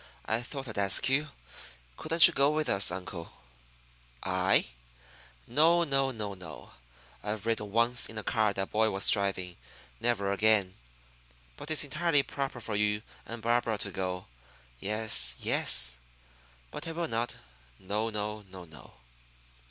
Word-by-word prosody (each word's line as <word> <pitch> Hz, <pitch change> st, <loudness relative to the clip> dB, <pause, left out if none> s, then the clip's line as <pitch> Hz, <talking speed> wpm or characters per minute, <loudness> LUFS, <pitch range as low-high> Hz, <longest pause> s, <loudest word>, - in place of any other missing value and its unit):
"I 110 Hz, +2 st, -1 dB
thought 135 Hz, +2 st, -7 dB
I'd 110 Hz, -3 st, -5 dB
ask 100 Hz, +5 st, +5 dB
you. 145 Hz, +3 st, 0 dB, 0.7 s
Couldn't 165 Hz, -, +7 dB
you 170 Hz, -, +1 dB
go 140 Hz, -1 st, +3 dB
with 155 Hz, 0 st, -1 dB
us, 100 Hz, 0 st, +5 dB
uncle?" 90 Hz, -2 st, -7 dB, 0.9 s
"I? -, -, +1 dB, 0.8 s
No, 165 Hz, +7 st, +3 dB
no, 135 Hz, -3 st, +1 dB
no, 105 Hz, -5 st, -5 dB
no! 90 Hz, -4 st, -11 dB, 0.5 s
I've 105 Hz, 0 st, -5 dB
ridden 110 Hz, -3 st, -2 dB
once 115 Hz, +3 st, +3 dB
in 110 Hz, -, -9 dB
a 110 Hz, -, -4 dB
car 110 Hz, -3 st, +1 dB
that 95 Hz, -1 st, -4 dB
boy 110 Hz, +1 st, +2 dB
was 100 Hz, -1 st, +3 dB
driving. 95 Hz, -3 st, 0 dB, 0.4 s
Never 110 Hz, -4 st, -1 dB
again! 100 Hz, -2 st, +2 dB, 0.8 s
But 150 Hz, -, -9 dB
it's 155 Hz, -, +1 dB
entirely 150 Hz, 0 st, +1 dB
proper 135 Hz, -3 st, -5 dB
for 110 Hz, -2 st, -5 dB
you 105 Hz, 0 st, 0 dB, 0.2 s
and 115 Hz, -1 st, -8 dB
Barbara 115 Hz, -1 st, 0 dB
to 100 Hz, 0 st, 0 dB
go. 95 Hz, -2 st, -4 dB, 0.5 s
Yes, 105 Hz, -, +2 dB
yes. 60 Hz, -1 st, +2 dB, 0.7 s
But -, -, -7 dB
I 165 Hz, -, -4 dB
will 170 Hz, 0 st, -3 dB
not. 115 Hz, -2 st, -3 dB, 0.4 s
No, 105 Hz, +4 st, -3 dB
no, 105 Hz, 0 st, -4 dB
no, 90 Hz, -1 st, -11 dB
no!" 75 Hz, -6 st, -15 dB
110 Hz, 145 wpm, -29 LUFS, 100-130 Hz, 0.9 s, Couldn't